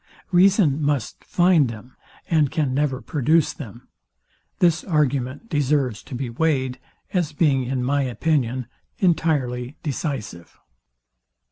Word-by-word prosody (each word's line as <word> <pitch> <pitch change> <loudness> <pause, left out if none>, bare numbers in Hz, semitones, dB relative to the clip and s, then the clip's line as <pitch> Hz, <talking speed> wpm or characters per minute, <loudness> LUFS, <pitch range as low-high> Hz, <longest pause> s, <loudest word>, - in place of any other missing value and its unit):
Reason 180 -5 +4
must 145 -5 -1
find 175 -7 +3
them, 115 +3 -10 0.3
and 155 -4 +3
can 145 -4 -1
never 135 -2 0
produce 155 +2 +2
them. 120 -3 -10 0.7
This 170 -2 +3
argument 145 - -1
deserves 145 - 0
to 135 - -7
be 130 +1 -3
weighed, 130 0 0 0.3
as 175 -5 0
being, 140 -4 +2
in 125 0 -2
my 140 +3 +1
opinion, 130 0 0 0.3
entirely 145 -7 0
decisive. 130 - -5
140 Hz, 115 wpm, -23 LUFS, 125-160 Hz, 0.7 s, Reason